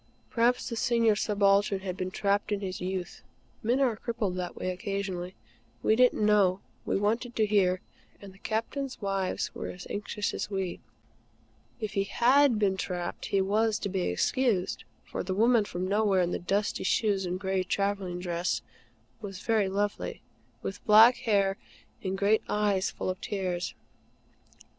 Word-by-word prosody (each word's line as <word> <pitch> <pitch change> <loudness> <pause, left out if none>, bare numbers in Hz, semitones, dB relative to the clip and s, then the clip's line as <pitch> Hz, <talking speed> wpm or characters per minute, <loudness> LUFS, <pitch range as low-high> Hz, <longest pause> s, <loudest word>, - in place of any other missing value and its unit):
Perhaps 240 +1 +2
the 235 - -3
Senior 230 -2 +3
Subaltern 200 -1 +2
had 185 -2 -4
been 185 0 -3
trapped 200 +2 0
in 205 -1 0
his 185 -2 -4
youth. 185 0 -4 0.4
Men 240 +4 +1
are 255 -5 +2
crippled 220 -4 -3
that 180 -1 -4
way 185 - -2
occasionally. 185 -1 -4 0.5
We 220 - +4
didn't 245 -3 +4
know; 200 -3 +4 0.3
we - - +1
wanted 230 +4 -1
to 220 - +3
hear; 190 -3 +2 0.4
and 200 -2 -11
the 195 - -20
Captains' 250 +6 -3
wives 195 -2 -2
were - - -5
as 180 - -8
anxious 205 0 -3
as - - -3
we. 190 -3 -3 1.0
If 215 -3 -4
he 195 -2 +1
HAD 255 +3 +4
been 195 -2 +1
trapped, 175 -2 -4
he 195 - +2
was 215 +3 +2
to 200 - -3
be 190 -1 -1
excused; 185 - 0 0.2
for - - -4
the 185 0 -3
woman 230 +1 +4
from 180 -1 -3
nowhere, 200 -2 +3
in 175 - -1
the - - -2
dusty 200 +4 -1
shoes, 195 -1 +1
and 180 +1 -3
gray 190 -1 0
travelling 195 -1 -1
dress, 175 -1 -1 0.6
was 195 -2 -7
very 215 -4 +2
lovely, 205 +1 -2 0.4
with 195 - -5
black 220 +3 +8
hair 200 -5 +1 0.5
and 190 0 -2
great 205 +2 +3
eyes 205 -2 +1
full - - -3
of 185 - -8
tears. 185 -3 -3
200 Hz, 160 wpm, -29 LUFS, 185-215 Hz, 1.0 s, black